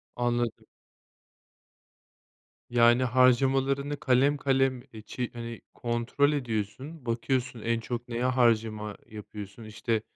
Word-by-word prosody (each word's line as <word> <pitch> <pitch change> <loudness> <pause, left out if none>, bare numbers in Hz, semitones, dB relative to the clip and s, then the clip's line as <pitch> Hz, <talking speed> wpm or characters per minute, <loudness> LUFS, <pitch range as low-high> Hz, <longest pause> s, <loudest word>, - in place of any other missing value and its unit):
Anladım. 120 -1 -1 2.0
Yani, 120 +1 +5
harcamalarını 135 +3 +3
kalem 140 +1 +3
kalem, 135 -2 +1
eee, 110 - -9
çi 120 +3 -4
hani, 115 -1 -7
kontrol 120 +5 +1
ediyorsun, 130 +3 -4
bakıyorsun, 120 0 -1
en 115 +1 0
çok 120 +1 -5
neye 120 0 -3
harcama 115 -4 +1
yapıyorsun, 105 0 -9
işte, 110 +1 -2
120 Hz, 100 wpm, -28 LUFS, 115-130 Hz, 2.0 s, Yani